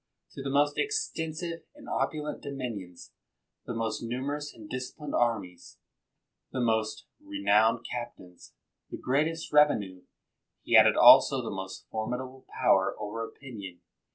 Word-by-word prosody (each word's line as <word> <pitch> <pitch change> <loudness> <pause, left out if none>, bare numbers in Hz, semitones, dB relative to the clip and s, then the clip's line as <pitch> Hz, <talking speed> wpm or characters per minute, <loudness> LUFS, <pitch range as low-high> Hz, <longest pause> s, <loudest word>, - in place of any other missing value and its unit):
To - - -8
the 135 - -3
most 145 +1 +2
extensive 170 - -2
and 295 -2 -14
opulent 150 -1 -2
dominions, 115 -11 -6 0.6
the 120 - -4
most 115 -1 -2
numerous 140 +5 -3
and 110 -2 -13
disciplined 130 +5 -6
armies, 105 -8 -1 0.7
the 130 - -3
most 110 -2 0 0.2
re 300 0 -6
nowned 115 +2 +4
captains, 120 -7 -8 0.3
the - - -6
greatest 155 +5 -1
revenue, 105 -12 +3 0.6
he - - +2
added - - +7
also - - +8
the - - -4
most 95 0 -7
formidable 125 +4 -5 0.2
power 95 0 +4
over 110 +2 -4
opinion. 105 -8 -9
125 Hz, 125 wpm, -29 LUFS, 110-145 Hz, 0.7 s, also